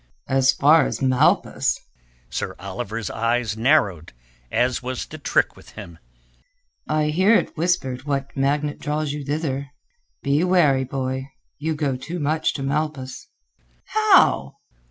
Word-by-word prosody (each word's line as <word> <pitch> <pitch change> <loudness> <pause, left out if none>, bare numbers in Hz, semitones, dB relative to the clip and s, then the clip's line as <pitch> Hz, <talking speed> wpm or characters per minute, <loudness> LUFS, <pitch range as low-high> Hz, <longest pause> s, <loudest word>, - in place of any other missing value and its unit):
"As 130 0 +4
far 150 +5 +5
as - - -4
Malpas?" 130 -2 +2 0.5
Sir - - -3
Oliver's 105 +4 -5
eyes 115 -1 0
narrowed, 110 - +1 0.4
as 125 0 +1
was 130 0 -4
the - - -10
trick - - +1
with - - -16
him. 85 -1 -10 0.9
"I 155 0 +1
hear 190 +8 +4
it - - 0
whispered 150 -6 -1
what 140 -1 -3
magnet 145 +2 0
draws 150 0 -2
you 150 -1 -5
thither," 145 -1 -2
he 140 - -5
said. 480 - -26 0.2
"Be - - +2
wary, 155 -8 +3
boy. 130 0 -3 0.3
You 160 +2 -1
go 145 -3 -1
too 170 +7 -6
much 155 +1 0
to 135 - -4
Malpas." 140 -2 -3 0.6
"How?" 390 - +4
140 Hz, 140 wpm, -22 LUFS, 130-155 Hz, 0.9 s, far